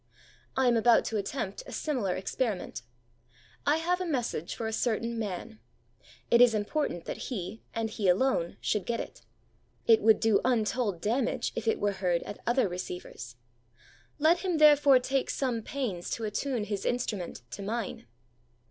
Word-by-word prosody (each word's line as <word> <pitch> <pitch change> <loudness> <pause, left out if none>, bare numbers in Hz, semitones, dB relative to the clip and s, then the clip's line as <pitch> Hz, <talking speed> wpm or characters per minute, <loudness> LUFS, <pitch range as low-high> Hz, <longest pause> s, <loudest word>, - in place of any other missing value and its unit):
I 265 - +3
am 240 - +4
about 230 +1 +5
to 225 - -1
attempt 205 -1 -3
a - - -8
similar 245 - -1
experiment. 195 - -2 0.9
I 295 +2 +4
have 355 +3 0
a - - -1
message 240 - -2
for 230 - -4
a 220 - -2
certain 230 0 -1
man. 215 +2 -5 0.7
It 235 - +6
is 240 -2 +6
important 210 - -1
that - - -5
he, 205 -3 -5
and 225 0 0
he 215 -2 -2
alone, 180 -3 +2
should 210 -3 -1
get 235 -1 -1
it. - - -7 0.6
It 225 -1 +6
would 220 0 +5
do 220 -3 +3
untold 225 -6 0
damage 235 +5 0
if 230 0 -4
it 225 - +2
were 205 0 +1
heard 180 -3 0
at 205 - -8
other 240 -1 +3
receivers. 180 -9 -7 0.8
Let 320 +3 +4
him 360 -3 -1
therefore 290 -3 +7
take 265 +1 -1
some 250 -4 -1
pains 215 -9 -4
to 230 - -7
attune 220 +3 -1
his 205 -1 -3
instrument 210 - -2
to - - -6
mine. 210 - -4
225 Hz, 165 wpm, -29 LUFS, 200-255 Hz, 0.9 s, therefore